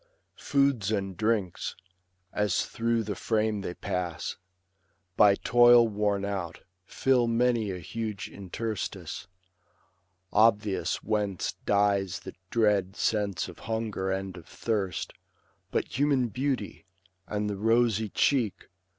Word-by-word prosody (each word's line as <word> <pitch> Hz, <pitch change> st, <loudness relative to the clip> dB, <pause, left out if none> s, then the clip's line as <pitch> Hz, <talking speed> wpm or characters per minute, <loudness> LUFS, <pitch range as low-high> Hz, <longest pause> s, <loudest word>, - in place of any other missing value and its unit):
Foods 140 Hz, -7 st, +2 dB
and 95 Hz, -3 st, -1 dB
drinks, 105 Hz, -2 st, -1 dB, 0.6 s
As 105 Hz, -3 st, +1 dB
through 115 Hz, 0 st, 0 dB
the 105 Hz, -1 st, -3 dB
frame 110 Hz, -1 st, 0 dB
they 90 Hz, -2 st, -5 dB
pass, 85 Hz, -4 st, -3 dB, 0.8 s
by 100 Hz, -2 st, +6 dB
toil 120 Hz, +1 st, +6 dB
worn 105 Hz, -2 st, 0 dB
out, 95 Hz, -5 st, -4 dB, 0.3 s
Fill 130 Hz, -3 st, +2 dB
many 115 Hz, -2 st, +2 dB
a 95 Hz, -, -3 dB
huge 110 Hz, +2 st, -5 dB
interstice; 95 Hz, -4 st, -5 dB, 1.1 s
obvious 105 Hz, -2 st, +2 dB
whence 105 Hz, -4 st, -1 dB
Dies 100 Hz, -2 st, +2 dB
the -, -, -8 dB, 0.2 s
dread 105 Hz, -4 st, +2 dB
sense 105 Hz, -4 st, 0 dB
of -, -, -11 dB
hunger 110 Hz, -4 st, -2 dB
and 95 Hz, -1 st, -3 dB
of 85 Hz, -, -12 dB
thirst; 100 Hz, -7 st, -2 dB, 0.6 s
But 125 Hz, -, -2 dB
human 140 Hz, -4 st, +3 dB
beauty, 125 Hz, -5 st, -3 dB, 0.4 s
and 105 Hz, +1 st, -2 dB
the 100 Hz, -1 st, -3 dB
rosy 110 Hz, 0 st, +2 dB
cheek. 120 Hz, -2 st, +1 dB
105 Hz, 115 wpm, -28 LUFS, 95-115 Hz, 1.1 s, by